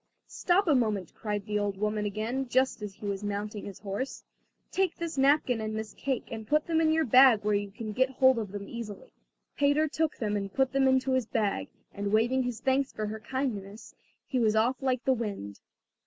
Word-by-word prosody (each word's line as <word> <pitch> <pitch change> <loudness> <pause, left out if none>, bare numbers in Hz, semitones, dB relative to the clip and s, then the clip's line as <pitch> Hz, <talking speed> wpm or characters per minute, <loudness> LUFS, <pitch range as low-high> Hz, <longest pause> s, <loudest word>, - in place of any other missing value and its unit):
"Stop 375 +2 +1
a 310 - +5
moment," 215 - 0
cried 210 -2 -4
the 210 -1 -1
old 200 -1 -2
woman 210 +1 -1
again, 225 +6 -2
just 260 -2 +1
as 205 -2 -6
he 210 - -10
was 200 0 -3
mounting 205 +1 -4
his 200 -2 -8
horse, 210 +7 -4 0.5
"take 380 -2 +1
this 335 -1 -4
napkin 270 -4 +3
and 215 0 -3
this 220 0 -5
cake, 270 -3 -3
and 220 -1 -6
put 300 +3 +2
them 325 -1 +1
in 315 -1 +3
your 320 0 +2
bag 255 -3 +6
where 210 0 +1
you 205 0 0
can 215 +2 -6
get 260 +4 +2
hold 260 -1 +4
of 210 -4 -5
them 200 0 -6
easily." 225 -4 -8 0.4
Peter 285 +2 +3
took 310 +1 -1
them 210 -2 -1
and 195 -1 -4
put 265 0 +2
them 270 -1 +3
into 260 0 +2
his 260 -4 +1
bag, 210 -4 -1 0.3
and 200 0 -3
waving 235 +5 +3
his 245 -3 -3
thanks 270 +1 +1
for 215 - -4
her 215 +1 -5
kindness, 215 -4 -4 0.3
he 260 - -1
was 220 -2 +3
off 240 +5 +2
like 260 -1 0
the 265 - +3
wind. 200 - -5
230 Hz, 215 wpm, -29 LUFS, 210-265 Hz, 0.5 s, bag